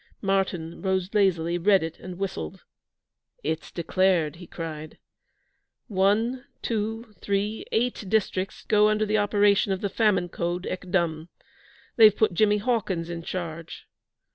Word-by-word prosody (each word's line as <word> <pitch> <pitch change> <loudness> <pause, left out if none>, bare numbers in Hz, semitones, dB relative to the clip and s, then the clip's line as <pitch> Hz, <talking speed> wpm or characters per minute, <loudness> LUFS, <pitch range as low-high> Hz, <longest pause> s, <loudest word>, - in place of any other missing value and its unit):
Martyn 190 -4 -1
rose 190 0 -1
lazily, 175 -4 +2
read 195 0 +4
it, 165 0 -6
and 180 -1 -8
whistled. 130 - -5 0.8
'It's 160 +1 -3
declared!' 170 -2 +1
he 175 -1 -11
cried. 155 -2 -7 0.9
'One, 215 +6 +1 0.2
two, 225 0 -3
three 205 +2 -1
eight 235 -1 0
districts 190 -2 -1
go 210 0 +5
under 215 0 +1
the 215 0 +1
operation 205 -1 +3
of 190 - -1
the 200 - -1
Famine 195 -4 +2
Code 175 +1 -3
ek 180 0 -5
dum. 170 -3 0 0.7
They've 215 -3 +7
put 220 -4 +2
Jimmy 210 +3 +3
Hawkins 200 -7 -1
in 170 -1 -5
charge.' 165 -2 -6
190 Hz, 135 wpm, -26 LUFS, 170-210 Hz, 0.9 s, They've